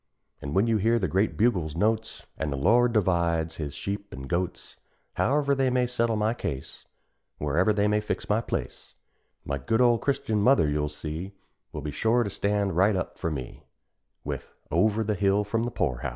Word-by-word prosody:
An' 70 - -5
when 100 - +4
you 115 -1 +2
hear 115 +3 +2
the 95 -5 0
great 95 +7 0
bugle's 90 -9 +1
notes, 110 +4 -1
An' 80 - -3
the 70 - -3
Lord 120 - +4
divides 85 -6 +1
his 75 -3 -5
sheep 100 +1 -4
an' 65 - -8
goats; 85 +5 -3 0.4
However 140 +1 +2
they 135 -1 +2
may 125 0 +2
settle 115 -2 0
my 105 +1 +1
case, 70 - -6 0.5
Wherever 80 +8 +2
they 105 0 +2
may 105 0 +2
fix 105 - -4
my 105 +2 +2
place, - - -5 0.5
My 70 0 -2
good 110 - 0
old 120 -2 +4
Christian 110 -6 0
mother, 125 - +4
you'll 75 0 0
see, 80 +6 -6 0.4
Will 75 - -5
be 75 0 -4
sure 115 +8 +2
to 100 - -4
stand 100 -2 0
right 100 +4 +4
up 90 - -4
for 85 - -1
me, 65 -6 -6 0.6
With - - -6 0.2
_over 110 +7 +2
the 105 - +1
hill 100 +1 +2
from 115 +3 -1
the - - -1
poor 70 - -1
house. - - -3
100 Hz, 195 wpm, -27 LUFS, 80-115 Hz, 0.6 s, when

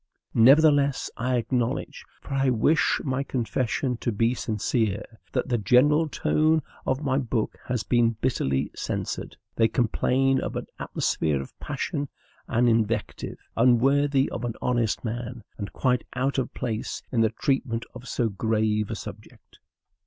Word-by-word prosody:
Nevertheless, 140 +3 +5
I 125 +2 0
acknowledge 120 0 -1 0.2
for - - -7
I 135 -1 +2
wish 125 +6 +3
my 130 -1 -1
confession 125 -1 -1
to 120 - -2
be 115 +3 +2
sincere 110 -2 -1 0.3
that 130 0 -1
the 120 -2 +1
general 145 +9 +4
tone 155 +1 +2 0.2
of 130 +3 0
my 135 -1 +1
book 115 -4 -2
has 125 -3 -1
been 120 -2 +2
bitterly 70 - 0
censured. - - -4 0.2
They 115 - +5
complain 130 +3 +2
of - - -4
an - - -3
atmosphere 75 -4 0
of 65 - -8
passion 145 0 -3 0.4
and 120 +2 +2
invective 115 -2 0 0.2
unworthy 135 +4 +4
of - - -4
an 120 -2 -2
honest 120 -2 0
man, 120 +1 -4 0.2
and 100 - -4
quite 125 -2 +1
out 135 +2 0
of 130 - -2
place 115 -3 -3
in 115 - +2
the 110 - +4
treatment 115 -1 -1
of 125 +1 -10
so 120 - 0
grave 110 0 0
a - - -3
subject. - - -11
125 Hz, 145 wpm, -26 LUFS, 115-135 Hz, 0.4 s, Nevertheless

